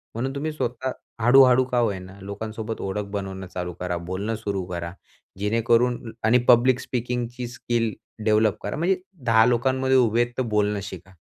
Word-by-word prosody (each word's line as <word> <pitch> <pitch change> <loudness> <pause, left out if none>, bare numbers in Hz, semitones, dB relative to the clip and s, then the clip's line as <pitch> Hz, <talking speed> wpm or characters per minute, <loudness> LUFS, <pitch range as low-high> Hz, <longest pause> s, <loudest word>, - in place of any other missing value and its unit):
म्हणून 130 +4 -2
तुम्ही 155 +3 -2
स्वतः 130 -3 -3 0.3
हळू-हळू 125 +1 +6
का 125 -1 -2
होईना 95 -4 -2
लोकांसोबत 110 +3 -5
ओळख 100 +1 -3
बनवणं 95 -2 -5
चालू 90 -1 -5
करा, 90 -1 -2
बोलणं 95 +6 -3
सुरू 100 -3 -3
करा. 85 -1 -5 0.5
जेणेकरून 115 +3 +1
आणि 110 +3 +5
पब्लिक 125 +1 +5
स्पीकिंगची 125 0 -3
स्किल 120 -1 -1 0.3
डेव्हलप 110 -1 +3
करा 105 - -3
म्हणजे 180 +4 +2 0.3
10 110 -1 +5
लोकांमध्ये 130 +2 +2
उभे 120 -2 +3
आहेत 120 0 0
तर - - +1
बोलणं 105 -1 +1
शिका 95 -2 -9
115 Hz, 155 wpm, -24 LUFS, 100-125 Hz, 0.5 s, हळू-हळू